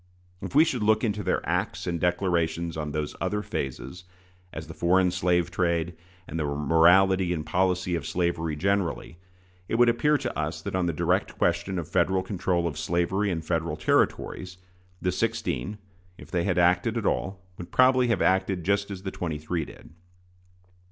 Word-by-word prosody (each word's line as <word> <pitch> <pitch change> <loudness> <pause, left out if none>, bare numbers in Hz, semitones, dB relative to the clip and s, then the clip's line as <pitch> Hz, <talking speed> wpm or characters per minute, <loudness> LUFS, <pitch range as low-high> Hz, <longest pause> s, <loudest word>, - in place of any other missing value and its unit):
If - - -6
we 155 +3 +7
should 125 -7 -2
look 110 +2 +3
into 105 -2 0
their 95 -2 -1
acts - - -1
and 85 -1 -2
declarations 85 -2 0
on 75 -1 -4
those 75 -1 -3
other 105 0 -1
phases, 65 +5 -5 0.5
as - - -7
the - - -9
foreign 90 +1 +3
slave 90 -1 +1
trade, 85 -1 0 0.3
and 80 - -4
the - - 0
morality 85 +6 +4
and 80 -3 -2
policy 90 -1 0
of 85 -4 -2
slavery 85 -3 -1
generally, 95 -1 -1 0.5
it - - 0
would 120 +1 +5
appear 150 +6 +3
to 130 -3 -4
us 80 +2 -2
that - - -4
on 90 -1 +1
the - - +1
direct 75 - 0
question 85 +2 0
of 85 -3 -3
Federal 95 0 +1
control 90 -2 -1
of 75 -2 -5
slavery 85 +5 0
in 80 -3 -2
Federal 80 -1 -1
Territories, 90 +3 0 0.4
the 90 - 0
sixteen, 95 +5 -2 0.4
if - - -13
they 85 -2 0
had 90 -3 0
acted 90 +6 +3
at 115 - -2
all, 95 0 -1 0.2
would 90 - -7
probably 130 -1 +4
have 115 - +1
acted 95 0 +1
just 100 +3 +1
as 95 -2 -7
the 95 - -4
twenty 80 -4 -4
three 80 +1 -3
did. - - -14
90 Hz, 180 wpm, -26 LUFS, 85-95 Hz, 0.5 s, we